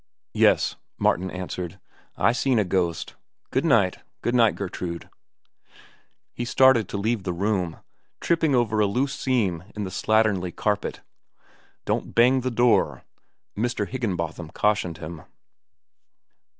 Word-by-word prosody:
"Yes," - - +3 0.2
Martin 95 +1 +1
answered. 90 0 -6 0.4
"I - - +4
seen 125 +1 +1
a 105 - +3
ghost. 85 -3 -1 0.4
Good 130 - +1
night. 100 - +3 0.2
Good 120 - 0
night, 115 -3 +4
Gertrude." 90 -3 -5 1.2
He 120 - -4
started 125 -3 +4
to - - -3
leave 110 +2 0
the 95 - -3
room, 95 -2 -1 0.4
tripping 160 -4 +2
over 110 -3 +1
a 105 - +4
loose 130 +7 0
seam 105 -13 0
in 105 - -3
the 95 - -5
slatternly 100 -3 +1
carpet. 105 -2 -1 0.8
"Don't - - -2
bang 125 +3 +5
the 130 - -1
door," 120 0 +2 0.5
Mr. 115 -2 -1
Higginbotham 90 -9 -3
cautioned 105 -6 +1
him. 85 0 -8
105 Hz, 125 wpm, -25 LUFS, 90-120 Hz, 1.2 s, bang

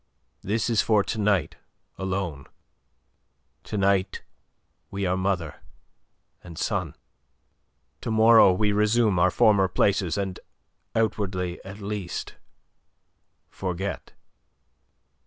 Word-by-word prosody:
This 110 +3 -1
is 115 -3 +2
for 105 -3 +2
to 110 - -4
night 105 -4 +1 0.4
alone. 95 -7 -4 1.2
To 105 - -4
night 100 -1 +1 0.7
we 100 0 -3
are 90 0 +1
mother 95 -4 -2 0.8
and 85 -3 -11
son. - - -2 1.1
To - - -4
morrow 110 -2 +6
we 105 +3 +1
resume 105 -1 +2
our 90 +2 +4
former 100 +1 +4
places, 95 -2 +1
and, 95 -2 -3 0.6
outwardly 95 -5 -1
at 100 +2 -10
least, 100 -3 -5 1.1
forget." 95 +1 -5
100 Hz, 100 wpm, -25 LUFS, 90-105 Hz, 1.2 s, morrow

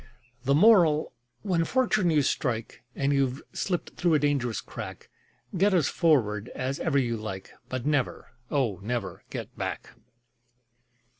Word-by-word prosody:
The 140 +2 +4
Moral: 170 -5 +5 0.3
When 180 -5 +1
fortune 215 -4 +2
you 150 -3 +3
strike, 120 -4 -2
And 140 +1 +1
you've 135 -1 +1
slipped 180 -3 -2
through 170 -3 +3
a - - +6
dangerous 140 -5 0
crack, - - -8 0.4
Get 195 +2 +3
as 160 -6 +3
forward 120 - +2
as 130 +2 -2
ever 150 -4 +1
you 120 -4 +1
like, 95 -3 -6 0.2
But 130 -1 -4
never, 145 -3 -1 0.2
oh, 120 -10 0
never 115 0 -3
get - - -7
back! - - -4
140 Hz, 140 wpm, -27 LUFS, 120-165 Hz, 0.4 s, a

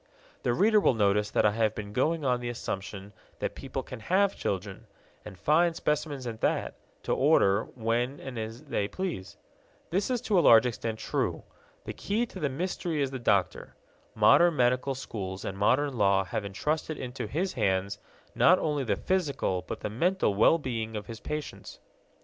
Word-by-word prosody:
The - - 0
reader 215 - +4
will 160 - +3
notice 105 0 +2
that - - +2
I 105 - +5
have 110 0 0
been 105 -1 -6
going 155 +5 0
on 125 -2 +2
the 120 0 -4
assumption 100 -3 -6 0.2
that - - -3
people 135 -1 -5
can 125 - -9
have 190 - +2
children, 100 +3 -4 0.4
and 100 -3 -10
fine 165 - +3
specimens 150 -4 -2
at 115 -2 -6
that, - - 0 0.3
to - - 0
order 100 +3 +3
when 120 +3 -1
and 125 -3 -6
as 110 +4 -6
they 120 -9 -1
please. 175 - -5 0.5
This 195 +6 0
is 250 -1 0
to 200 -5 +2
a - - +5
large 115 -6 +7
extent 115 -2 -3
true. - - -2 0.4
The - - -5
key 220 +4 -1
to 200 - -10
the 150 -4 0
mystery 170 +2 -3
is 135 -2 0
the 130 - -5
doctor. 100 -6 0 0.4
Modern 175 -1 +5
medical 125 +1 +1
schools 95 -7 -6
and 95 - -4
modern 130 +8 +2
law 100 -3 +3
have 100 +3 -4
entrusted 150 +10 -2
into 125 +1 -5
his 180 +6 -2
hands 100 -3 0 0.3
not 185 - +5
only 150 -5 -1
the 105 -5 0
physical 145 - -1
but 110 - -5
the - - -3
mental 175 - +1
well 105 +11 +5
being 115 -6 -4
of 105 -1 -5
his 115 -1 -8
patients. 150 +2 -6
125 Hz, 180 wpm, -28 LUFS, 105-155 Hz, 0.5 s, large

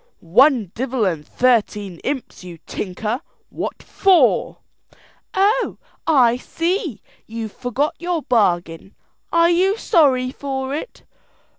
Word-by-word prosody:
"One 225 - +4
divel 255 -2 -1
and 165 -5 -1
thirteen 210 -7 +1
imps, 265 -8 -5
you 175 -2 -9
tinker! 215 +6 -4 0.3
what - - -5
for?" 380 -3 +3 0.8
"Oh, 415 +6 +2 0.3
I 250 -7 +4
see, 335 - -3 0.2
you've 225 -1 -6
forgot 255 +5 -1
your 345 -3 -2
bargain. 175 -5 0 0.4
Are 335 0 +4
you 380 +4 +2
sorry 260 - +3
for 270 -1 -4
it?" 315 +12 -6
255 Hz, 110 wpm, -20 LUFS, 210-330 Hz, 0.8 s, One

